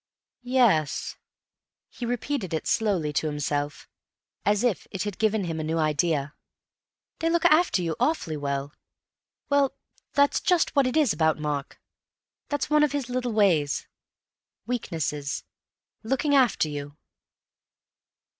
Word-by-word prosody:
"Yes." 240 - +2 0.8
He 240 - -5
repeated 240 - -2
it 160 - -3
slowly 190 -9 +1
to 155 - 0
himself, 145 0 -3 0.6
as 205 +2 +2
if 240 -7 0
it 190 - -3
had 205 -3 -5
given 220 -2 +2
him 165 -2 -3
a - - -2
new 160 +1 -1
idea: 155 -2 +1 0.9
"They 330 - +1
look 340 0 +1
after 310 - +4
you 165 -2 -1
awfully 300 - 0
well. 140 0 -3 0.8
Well, 285 -2 +2 0.4
that's 285 0 +3
just 355 -4 +2
what 275 -2 +4
it 255 - 0
is 295 -8 +4
about 160 0 +2
Mark. 150 -2 -4 0.7
That's 290 -1 -1
one 300 0 +4
of 300 -2 +2
his 275 -4 -2
little 250 -1 -1
ways. 170 -10 +2 0.8
Weaknesses. 160 - -3 0.6
Looking 270 +6 0
after 255 - +4
you." 145 0 -6
200 Hz, 130 wpm, -26 LUFS, -, 0.9 s, after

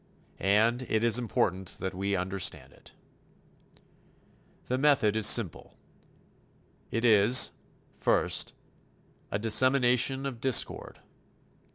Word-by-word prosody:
And 110 +5 0
it 110 0 -1
is 120 +1 +3
important 95 -5 -3
that 95 - -6
we 100 +2 -3
understand 90 -8 -4
it. - - -20 1.7
The 125 +1 -3
method 135 -7 +1
is 110 -1 +4
simple. 105 -10 +1 1.1
It 115 +1 -3
is, 110 +2 +5 0.4
first, - - 0 0.7
a - - -3
dissemination 125 +4 +1
of 125 -4 -7
discord. 130 -1 0
110 Hz, 95 wpm, -27 LUFS, 100-125 Hz, 1.7 s, is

